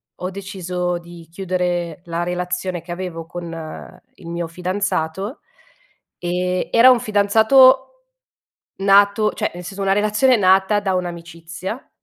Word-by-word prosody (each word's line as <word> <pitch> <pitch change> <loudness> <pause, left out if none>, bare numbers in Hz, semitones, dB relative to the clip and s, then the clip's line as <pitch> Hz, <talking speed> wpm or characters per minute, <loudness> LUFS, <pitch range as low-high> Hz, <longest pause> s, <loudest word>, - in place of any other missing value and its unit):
ho 185 +1 -5
deciso 180 -2 -3
di 170 -1 -13
chiudere 175 -2 -2
la 170 0 -3
relazione 180 0 -3
che 170 - -10
avevo 175 -2 -6
con 165 -2 -8
il 170 - -14
mio 170 0 -3
fidanzato, 185 - -3 0.8
ehm, 180 +1 -2
era 235 +3 +7
un 250 - +3
fidanzato 220 +4 +5 1.0
nato 200 +2 +4
cioè - - -2
nel 175 0 -8
senso, 195 +3 -6
una 195 0 +2
relazione 215 +5 +3
nata 190 +1 +3
da 195 -2 -1
un'amicizia 175 +4 -6
180 Hz, 125 wpm, -20 LUFS, 175-200 Hz, 1.0 s, era